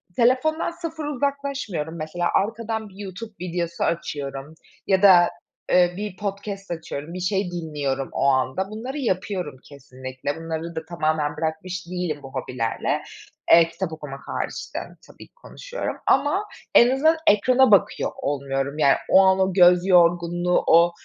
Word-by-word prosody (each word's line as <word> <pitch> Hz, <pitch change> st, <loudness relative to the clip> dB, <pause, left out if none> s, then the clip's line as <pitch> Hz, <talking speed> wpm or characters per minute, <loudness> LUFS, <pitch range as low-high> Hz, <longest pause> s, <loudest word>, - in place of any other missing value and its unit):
telefondan 265 Hz, +8 st, +2 dB
sıfır 320 Hz, -2 st, -6 dB
uzaklaşmıyorum. 275 Hz, -, -3 dB
Mesela 160 Hz, +3 st, -2 dB
arkadan 220 Hz, +1 st, -1 dB
bir 190 Hz, -, -18 dB
YouTube 205 Hz, +2 st, -8 dB
videosu 170 Hz, -1 st, -3 dB
açıyorum 145 Hz, -3 st, -3 dB, 0.3 s
ya 190 Hz, 0 st, +3 dB
da, 180 Hz, -3 st, +7 dB, 0.4 s
eee, 180 Hz, -1 st, +4 dB
bir 205 Hz, -3 st, -5 dB
podcast 200 Hz, -1 st, -5 dB
açıyorum, 160 Hz, -1 st, -6 dB
bir 185 Hz, -, -5 dB
şey 190 Hz, 0 st, -1 dB
dinliyorum 145 Hz, -5 st, -3 dB
o -, -, -1 dB
anda. 135 Hz, +8 st, +1 dB
Bunları 245 Hz, +7 st, -6 dB
yapıyorum, 185 Hz, -, -2 dB
kesinlikle. 130 Hz, -1 st, -7 dB
Bunları 165 Hz, +1 st, -5 dB
da 160 Hz, -1 st, -5 dB
tamamen 155 Hz, -3 st, -1 dB
bırakmış 165 Hz, +3 st, -4 dB
değilim 175 Hz, -4 st, -3 dB
bu 135 Hz, -, -11 dB
hobilerle. 125 Hz, -3 st, -2 dB, 0.5 s
Eee, 165 Hz, 0 st, +8 dB
kitap 175 Hz, -1 st, -4 dB
okumak 145 Hz, -3 st, -8 dB
hariç -, -, -4 dB
de -, -, 0 dB, 0.3 s
tabii -, -, -14 dB
ki -, -, -46 dB
konuşuyorum -, -, -6 dB
ama 375 Hz, +9 st, +2 dB, 0.3 s
en 240 Hz, -, +8 dB
azından 315 Hz, +5 st, +3 dB
ekrana 250 Hz, +4 st, +5 dB
bakıyor 200 Hz, -, +3 dB
olmuyorum. 140 Hz, 0 st, -2 dB
Yani, 140 Hz, -2 st, +5 dB
o 190 Hz, -, +7 dB
an, 190 Hz, 0 st, +4 dB
o 190 Hz, -1 st, +1 dB
göz 180 Hz, -1 st, +6 dB
yorgunluğu, 175 Hz, 0 st, +3 dB
o, 170 Hz, +1 st, +6 dB
175 Hz, 145 wpm, -23 LUFS, 155-210 Hz, 0.5 s, Eee